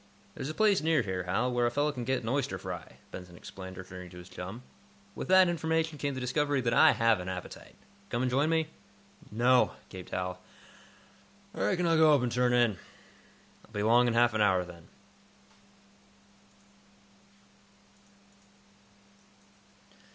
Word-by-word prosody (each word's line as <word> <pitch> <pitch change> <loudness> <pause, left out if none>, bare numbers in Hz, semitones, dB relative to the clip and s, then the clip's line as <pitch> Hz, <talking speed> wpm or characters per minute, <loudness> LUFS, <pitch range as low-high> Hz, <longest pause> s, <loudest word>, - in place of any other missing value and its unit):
"There's 135 - -5
a 155 - -5
place 210 -3 +3
near 160 -4 +2
here, 95 -2 -3
Hal, 100 +8 0
where 120 0 +2
a - - +2
fellow 145 +5 0
can 125 -4 -6
get 130 0 -1
an 110 - -3
oyster 135 +1 -1
fry," - - -8 0.2
Benson 90 -1 -10
explained, 95 0 -10
returning 90 -1 -9
to 90 - -13
his 90 +1 -12
chum. 95 +7 -8 0.5
"With - - -6
that 185 0 +6
information 160 -2 -1
came 140 -2 -2
the - - -4
discovery 145 +3 0
that 115 -1 0
I - - +6
have 115 -3 +2
an 90 +1 -5
appetite. 90 -1 -8 0.3
Come 120 +2 -1
and 125 - 0
join 140 +5 +2
me?" 160 -1 +1 0.6
"No," 125 +3 +3 0.2
gaped 95 -2 -10
Hal. 90 0 -4 1.1
"I 95 - -2
reckon 175 - +1
I'll 165 -1 +3
go 155 -1 +6
up 135 - 0
and 120 - -1
turn 125 +1 +2
in." 120 -6 +2 0.8
"I'll - - -22
be 105 - -2
along 120 +3 +4
in 115 - 0
half 120 0 +4
an 110 - 0
hour, 95 -3 +3
then." 85 -2 -13
120 Hz, 160 wpm, -30 LUFS, 95-145 Hz, 1.1 s, that